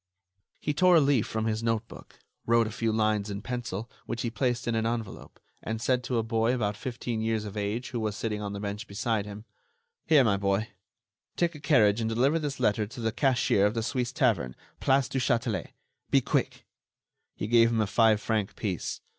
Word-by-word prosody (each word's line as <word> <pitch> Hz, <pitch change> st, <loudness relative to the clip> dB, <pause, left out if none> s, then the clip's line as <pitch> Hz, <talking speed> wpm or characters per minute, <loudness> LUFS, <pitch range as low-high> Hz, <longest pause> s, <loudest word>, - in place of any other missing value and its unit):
He 150 Hz, -, -1 dB
tore 180 Hz, +4 st, +5 dB
a -, -, +8 dB
leaf 140 Hz, -6 st, +2 dB
from 110 Hz, 0 st, -2 dB
his 110 Hz, 0 st, -1 dB
notebook, 115 Hz, 0 st, -4 dB, 0.3 s
wrote 115 Hz, 0 st, +4 dB
a 110 Hz, -, -4 dB
few 115 Hz, +1 st, -1 dB
lines 110 Hz, -1 st, +1 dB
in 100 Hz, 0 st, -5 dB
pencil, 120 Hz, -3 st, -4 dB, 0.2 s
which 120 Hz, 0 st, -3 dB
he 115 Hz, -, -2 dB
placed 120 Hz, -1 st, -1 dB
in 120 Hz, -, +1 dB
an 115 Hz, 0 st, 0 dB
envelope, 115 Hz, -4 st, -5 dB, 0.2 s
and 110 Hz, +1 st, -4 dB
said 125 Hz, +1 st, +1 dB
to 125 Hz, -, -1 dB
a 115 Hz, -, +1 dB
boy 115 Hz, +2 st, +1 dB
about 105 Hz, -4 st, -1 dB
fifteen 120 Hz, -1 st, -4 dB
years 110 Hz, -1 st, -1 dB
of 105 Hz, 0 st, -7 dB
age 105 Hz, +5 st, -3 dB
who 120 Hz, -, -2 dB
was 110 Hz, -2 st, -2 dB
sitting 105 Hz, -1 st, -3 dB
on 100 Hz, -1 st, -4 dB
the 100 Hz, -, -5 dB
bench 105 Hz, +1 st, -5 dB
beside 105 Hz, 0 st, -1 dB
him: 105 Hz, +2 st, -9 dB, 0.6 s
"Here, 150 Hz, -4 st, +6 dB
my 100 Hz, -4 st, +2 dB
boy; 100 Hz, +3 st, 0 dB, 0.7 s
take 170 Hz, -1 st, +1 dB
a 150 Hz, -, -10 dB
carriage 120 Hz, -8 st, +3 dB
and 110 Hz, -, 0 dB
deliver 135 Hz, +8 st, +2 dB
this 145 Hz, -3 st, -4 dB
letter 105 Hz, -3 st, +1 dB
to 125 Hz, +4 st, -10 dB
the 115 Hz, -1 st, 0 dB
cashier 120 Hz, -5 st, +2 dB
of 105 Hz, -, -3 dB
the 115 Hz, -, -1 dB
Suisse 125 Hz, 0 st, -1 dB
tavern, 105 Hz, -, +1 dB, 0.2 s
Place 135 Hz, -1 st, +3 dB
du 135 Hz, -, -2 dB
Châtelet. 120 Hz, -5 st, 0 dB, 0.4 s
Be -, -, +5 dB
quick!" -, -, -1 dB, 0.7 s
He -, -, -4 dB
gave 115 Hz, +1 st, +5 dB
him 115 Hz, -1 st, 0 dB
a 110 Hz, -, +3 dB
five 110 Hz, +1 st, +3 dB
franc 105 Hz, -2 st, -1 dB
piece. 95 Hz, -6 st, -3 dB
115 Hz, 205 wpm, -28 LUFS, 105-125 Hz, 0.7 s, a